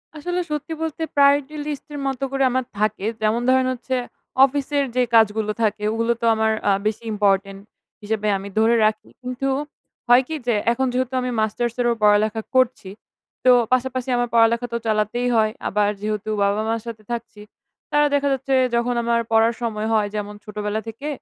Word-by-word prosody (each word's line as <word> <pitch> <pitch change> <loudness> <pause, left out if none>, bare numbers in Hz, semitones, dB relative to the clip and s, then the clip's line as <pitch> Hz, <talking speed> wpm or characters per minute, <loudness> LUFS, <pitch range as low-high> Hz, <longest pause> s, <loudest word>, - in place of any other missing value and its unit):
আসলে 355 +4 -3
সত্যি 300 +2 -3
বলতে 320 0 -4
প্রায়োরিটি 285 +1 +3
লিস্টের 295 0 -6
মতো 270 0 -3
করে 275 0 0
আমার 260 0 0
থাকে। 215 -1 0 0.2
যেমন 215 +2 +1
ধরেন 260 0 +3
হচ্ছে, 255 +1 -4 0.5
অফিসের 285 +1 -1
যে 250 - +3
কাজগুলো 215 -1 +3
থাকে, 210 -1 0
ওগুলো 230 +1 +1
তো - - 0
আমার 220 0 +1 0.2
আ - - +5 0.2
বেশি 220 +2 -3
ইম্পর্টেন্ট 195 -1 +1 0.4
হিসেবে 215 0 -2
আমি 195 +1 -8
ধরে 225 +2 +4
রাখি। 215 0 -1
কিন্তু 255 +2 -3 0.6
হয় 245 +2 +7
কি? 320 - -4
যে 240 - +3 0.2
এখন 265 +3 0
যেহেতু 255 0 -1
আমি 250 0 -2
মাস্টার্সেরও 240 +2 0
পড়ালেখা 210 +1 +3
করছি। 255 -6 +2 0.6
তো 255 - +8 0.2
পাশাপাশি 255 0 -1
আমার 245 - 0
পড়ালেখা 235 +1 +3
তো - - +1
চালাতেই 215 +3 0
হয়। 215 -1 +3 0.2
আবার 205 0 +1
যেহেতু 215 0 -3
বাবা-মার 215 +3 0
সাথে 220 -2 -7
থাকছি, 230 -3 -6 0.5
তারা 295 0 +4
দেখা 285 0 +2
যাচ্ছে 270 +1 -2 0.2
যখন 240 +1 0
আমার 235 0 +1
পড়ার 225 +1 +4
সময় 220 -2 -2
হয়, 215 -2 +2
যেমন 210 0 -4
ছোটবেলা 210 0 -3
থেকে 225 +7 -7
230 Hz, 165 wpm, -22 LUFS, 215-260 Hz, 0.6 s, তো